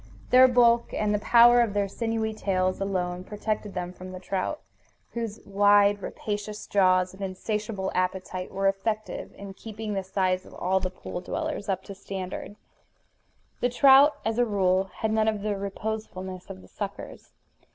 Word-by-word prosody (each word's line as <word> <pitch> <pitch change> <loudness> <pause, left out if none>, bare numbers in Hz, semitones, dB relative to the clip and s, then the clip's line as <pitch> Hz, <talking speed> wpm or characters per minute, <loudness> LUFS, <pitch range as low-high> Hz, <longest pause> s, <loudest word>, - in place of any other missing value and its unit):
Their 255 +1 +8
bulk, 240 -1 +4
and 210 0 0
the 210 - +1
power 240 +3 +6
of 220 -4 0
their 200 -1 +1
sinewy 225 +1 -2
tails, 185 -3 -1
alone 180 -2 -2
protected 210 0 -4
them 180 0 -4
from 185 0 -10
the 185 - -7
trout, 190 +10 -3 0.5
whose 230 -3 -4
wide, 205 0 +4
rapacious 210 +1 -5
jaws 185 -2 +3
and 190 - -13
insatiable 200 +1 -3
appetite 185 0 -2
were 195 0 0
effective 215 +3 -2
in 200 -1 -9
keeping 215 +1 -6
the 195 - -1
size 185 -1 0
of - - -14
all 190 +1 +1
the 185 0 -2
pool 180 -1 -7
dwellers 295 - -4
up 190 -1 -1
to 200 - -8
standard. 195 0 -6 1.0
The 245 - +1
trout, 275 +3 +6
as 225 +1 0
a - - +5
rule, 190 -3 +2
had 215 +3 -3
none 220 0 +2
of 215 -2 0
the 210 -1 -1
reposefulness 195 -2 -5
of 95 - -9
the - - -15
suckers. - - -7
200 Hz, 165 wpm, -26 LUFS, 185-220 Hz, 1.0 s, Their